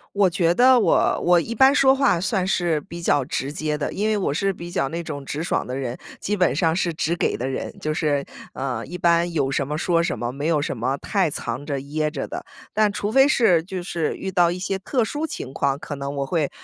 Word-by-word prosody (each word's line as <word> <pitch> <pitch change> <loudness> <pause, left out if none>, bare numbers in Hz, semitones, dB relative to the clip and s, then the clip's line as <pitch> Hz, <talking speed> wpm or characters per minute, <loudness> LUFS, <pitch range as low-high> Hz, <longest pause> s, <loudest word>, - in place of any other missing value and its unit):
我 200 -2 +4
觉 170 -1 +2
得 255 +2 +6
我 - - +3
我 175 -1 +5
一 230 - -4
般 265 +4 +6
说 265 -1 +5
话 270 -11 +2
算 190 -2 0
是 175 -5 +1
比 170 -3 -9
较 145 -5 +2
直 135 +2 -3
接 150 0 -2
的， 145 - -2
因 210 - -1
为 215 - +2
我 185 -7 -1
是 195 +5 +1
比 175 -1 -8
较 135 -5 0
那 170 +1 -3
种 145 -3 -6
直 145 +3 -4
爽 170 - -1
的 125 - -4
人， 130 -2 -3 0.2
基 210 +1 -1
本 180 -5 +2
上 160 +2 +1
是 175 -2 0
直 165 +1 -1
给 - - 0
的 125 - -3
人， 135 - -4
就 155 0 -2
是， 145 -3 0 0.3
呃， 130 -4 -3
一 180 - -7
般 170 0 +3
有 135 -4 0
什 135 0 0
么 150 +1 -3
说 170 0 +2
什 125 - -2
么， 120 +1 -2
没 140 +4 -4
有 160 -2 +2
什 145 - -3
么 130 +4 -1
太 190 -6 0
藏 125 -1 -4
着 140 -2 -3
掖 150 +2 -2
着 145 -3 -5
的。 - - -6 0.3
但 215 -1 +3
除 205 0 -2
非 270 +4 +6
是， 225 - +4
就 185 -1 -5
是 170 -3 -2
遇 190 - -4
到 175 -2 +3
一 175 - -3
些 190 +1 -2
特 240 +5 0
殊 295 +7 -2
情 135 - -7
况， 140 -1 0
可 145 - -6
能 140 0 -5
我 140 - -1
会 155 -2 0
170 Hz, 270 characters per minute, -23 LUFS, 140-190 Hz, 0.3 s, 得